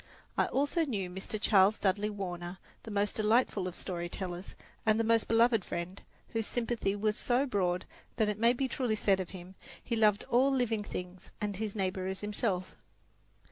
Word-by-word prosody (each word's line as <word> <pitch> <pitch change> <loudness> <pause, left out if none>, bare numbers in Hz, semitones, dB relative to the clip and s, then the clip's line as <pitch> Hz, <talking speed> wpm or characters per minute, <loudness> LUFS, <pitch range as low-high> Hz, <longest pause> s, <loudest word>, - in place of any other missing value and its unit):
I - - +3
also 290 +5 +1
knew 200 - -2
Mr. 190 +3 -4
Charles 205 0 +5
Dudley 205 +2 +1
Warner, 180 -3 -5 0.2
the - - -9
most 205 0 0
delightful 215 -3 +2
of 180 - -6
story 175 -2 -4
tellers 180 0 -5 0.3
and 220 -1 +3
the - - +3
most 225 0 +3
beloved 230 -2 +4
friend, 180 +3 -5 0.3
whose 225 -2 -2
sympathy 230 -4 -1
was 210 +1 +1
so 250 +5 +2
broad 185 -8 0 0.3
that 220 -2 +2
it 210 0 -2
may 235 +2 +5
be 265 +2 0
truly 250 -4 0
said 200 -2 +2
of 185 - -3
him, 185 0 -10 0.3
he 235 - -1
loved 215 -2 +4
all 255 +3 +5
living 240 -5 +1
things 180 -2 -7
and 205 -2 -2
his 215 0 -3
neighbour 190 -2 -1
as 190 0 -4
himself. 205 -3 -1
210 Hz, 180 wpm, -32 LUFS, 185-230 Hz, 0.3 s, Charles